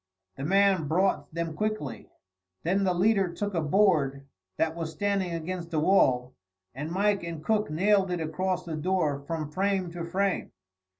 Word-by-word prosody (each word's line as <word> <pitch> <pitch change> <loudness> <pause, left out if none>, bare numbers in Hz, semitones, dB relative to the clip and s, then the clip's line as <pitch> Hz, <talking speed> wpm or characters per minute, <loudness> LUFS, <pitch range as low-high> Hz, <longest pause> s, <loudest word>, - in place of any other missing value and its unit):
The 135 - -6
man 195 -1 +3
brought 160 -2 +1
them 165 0 -3
quickly; 215 -6 -3 0.5
then 195 +4 +1
the 185 - +2
leader 195 -1 +3
took 205 +3 -3
a 170 - +1
board 150 -5 +2 0.3
that 160 0 0
was 165 -1 -4
standing 200 -1 -1
against 170 +1 -4
the 160 -2 0
wall, 130 -8 +3 0.4
and 145 +5 -5
Mike 200 +3 +1
and 165 -2 -6
Cook 210 0 +1
nailed 195 +4 +2
it 180 -1 -1
across 180 +4 -2
the 165 -2 -4
door 155 -3 0
from 155 +1 -4
frame 190 0 0
to 170 0 -5
frame. 190 +3 -1
175 Hz, 165 wpm, -28 LUFS, 155-195 Hz, 0.5 s, man